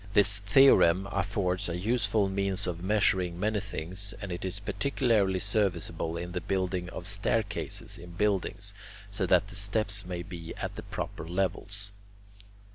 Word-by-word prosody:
This 100 Hz, -1 st, +5 dB
theorem 100 Hz, -4 st, +5 dB
affords 95 Hz, -1 st, -1 dB
a 85 Hz, -, -2 dB
useful 105 Hz, 0 st, +1 dB
means 95 Hz, -1 st, 0 dB
of 85 Hz, -2 st, -3 dB
measuring 95 Hz, -3 st, +2 dB
many 105 Hz, +2 st, +1 dB
things, 100 Hz, 0 st, -5 dB
and 100 Hz, -2 st, -6 dB
it 85 Hz, -, -4 dB
is 95 Hz, +1 st, -2 dB
particularly 105 Hz, -1 st, +1 dB
serviceable 90 Hz, -4 st, 0 dB
in 90 Hz, +1 st, -5 dB
the 90 Hz, 0 st, -3 dB
building 90 Hz, 0 st, -1 dB
of -, -, -7 dB
staircases 105 Hz, -2 st, 0 dB
in 85 Hz, +1 st, -10 dB
buildings, 100 Hz, 0 st, 0 dB, 0.4 s
so -, -, -1 dB
that 100 Hz, -, +3 dB
the 95 Hz, -, -9 dB
steps 100 Hz, 0 st, 0 dB
may 90 Hz, -2 st, -5 dB
be 85 Hz, -1 st, -8 dB
at -, -, -5 dB
the -, -, -6 dB
proper 80 Hz, -, -5 dB
levels. 100 Hz, +2 st, -1 dB
100 Hz, 150 wpm, -29 LUFS, 90-105 Hz, 0.4 s, This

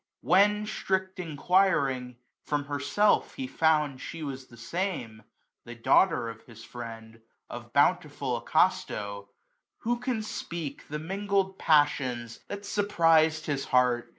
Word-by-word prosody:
'' -, -, -64 dB
When, 210 Hz, +2 st, +4 dB
strict 190 Hz, -3 st, -2 dB
enquiring, 145 Hz, -7 st, +1 dB, 0.3 s
from 145 Hz, -1 st, -1 dB
herself 145 Hz, +9 st, +1 dB
he 265 Hz, -, -4 dB
found 155 Hz, -, +1 dB
She 165 Hz, -1 st, -7 dB
was 135 Hz, -2 st, -6 dB
the 120 Hz, -, -16 dB
same, 120 Hz, -, -4 dB, 0.4 s
the 120 Hz, -, -9 dB
daughter 115 Hz, +3 st, +3 dB
of 115 Hz, 0 st, -8 dB
his 115 Hz, -1 st, -13 dB
friend. 115 Hz, -2 st, -9 dB, 0.3 s
Of -, -, -8 dB
bountiful -, -, +1 dB
Acasto 100 Hz, -1 st, 0 dB
j -, -, -38 dB, 0.5 s
who 240 Hz, +1 st, -1 dB
can 245 Hz, -3 st, -2 dB
speak 170 Hz, -8 st, -6 dB
2^^ -, -, -26 dB
The 150 Hz, -, -4 dB
mingled 195 Hz, +3 st, -1 dB
passions 130 Hz, -6 st, +1 dB
that 200 Hz, 0 st, -6 dB
surprized 165 Hz, -6 st, +3 dB
his 140 Hz, -2 st, -2 dB
heart. 125 Hz, -2 st, +2 dB
150 Hz, 135 wpm, -28 LUFS, 125-190 Hz, 0.5 s, When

